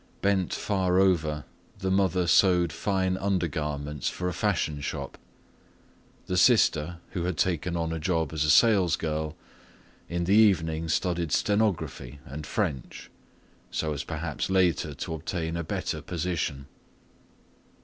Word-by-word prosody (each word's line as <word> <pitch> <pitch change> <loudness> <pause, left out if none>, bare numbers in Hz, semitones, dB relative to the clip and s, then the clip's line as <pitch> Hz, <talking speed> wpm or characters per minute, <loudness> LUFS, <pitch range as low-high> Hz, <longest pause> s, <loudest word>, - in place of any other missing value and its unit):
Bent 100 -3 +2
far 95 -3 0
over, 80 -6 +2 0.3
the 95 0 -2
mother 95 -2 +2
sewed 90 -1 +4
fine 95 -2 0
undergarments 75 -6 -2
for 90 - -4
a 90 - -2
fashion 75 -2 -1
shop. - - -5 1.1
The 90 - -2
sister, 90 -6 +4
who 90 -3 -3
had 90 -3 -2
taken 85 0 0
on 80 -1 -1
a 80 - -3
job 80 -2 -1
as 75 -2 0
a 75 - +1
salesgirl, 80 -5 +3 0.7
in 85 0 -1
the 95 +3 +2
evening 80 -7 +3
studied 85 -2 0
stenography 80 - 0
and 75 +4 -7
French, 80 - -3 0.6
so 80 -1 -2
as 70 - -4
perhaps 80 0 -4
later 95 -4 +2
to - - -5
obtain 80 +1 -3
a 85 - -2
better - - -3
position. 85 -5 -3
85 Hz, 130 wpm, -27 LUFS, 80-95 Hz, 1.1 s, sewed